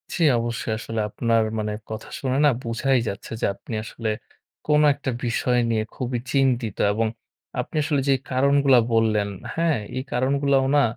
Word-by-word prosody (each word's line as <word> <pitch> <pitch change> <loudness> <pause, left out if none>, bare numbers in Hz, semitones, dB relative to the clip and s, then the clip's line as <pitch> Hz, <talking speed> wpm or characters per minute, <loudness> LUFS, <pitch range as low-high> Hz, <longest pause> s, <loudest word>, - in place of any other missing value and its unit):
জি। 175 - -3 0.2
অবশ্যই 115 -1 -2
আসলে 115 0 -4
আপনার 115 +1 +1 0.2
মানে 105 0 -2 0.2
কথা 110 0 -6
শুনে 130 -1 -1
না - - +7
বুঝাই 120 +3 +1
যাচ্ছে 100 - -6
যে - - +2
আপনি 115 - -9
আসলে 115 0 -4 0.6
কোন 150 0 +4
একটা 140 -1 -4
বিষয় 125 +1 +1
নিয়ে 110 -1 +1
খুবই 125 -1 -2
চিন্তিত 125 -6 +1 0.2
এবং 110 +2 +1 0.5
আপনি - - -4
আসলে 145 -2 +1
যে - - +6 0.2
কারণগুলা 140 0 +4
বললেন, 110 -2 +2 0.3
হ্যাঁ? 165 -3 +2 0.2
এই 130 - -2
কারণগুলাও 135 +2 +2
না 145 - +5
125 Hz, 160 wpm, -24 LUFS, 115-140 Hz, 0.6 s, না